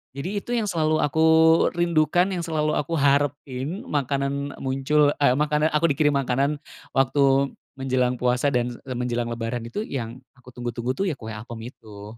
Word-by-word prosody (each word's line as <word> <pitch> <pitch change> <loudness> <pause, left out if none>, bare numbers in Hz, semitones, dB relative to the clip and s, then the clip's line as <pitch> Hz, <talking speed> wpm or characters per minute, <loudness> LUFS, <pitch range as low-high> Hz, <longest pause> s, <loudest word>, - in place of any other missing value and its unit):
Jadi, 185 +9 -3
itu 240 - -8
yang 225 - 0
selalu 155 -4 +1
aku 160 +3 +2 0.5
rindukan, 175 +2 +2
yang 180 - -2
selalu 155 -2 -1
aku 165 +3 -1
harapin. 140 +3 0
Makanan 140 0 -2
muncul, 135 +2 +2
eee, 130 -3 +4
makanan 150 +1 +2
aku 160 +2 +3
dikirim 145 0 +2
makanan 140 +2 0 0.4
waktu 135 +1 +3 0.3
menjelang 130 -2 0
puasa 125 +3 +1
dan 120 -1 0
e, 130 - -9
menjelang 120 -1 -2
lebaran 115 +1 -3
itu 120 - -4
yang 120 - -5 0.2
aku 125 0 -16
tunggu-tunggu 120 0 -3
tuh, 195 - 0
ya 175 - 0
kue 110 - -8
apem 115 +1 -8
itu. 105 -2 -12
140 Hz, 165 wpm, -24 LUFS, 125-150 Hz, 0.5 s, eee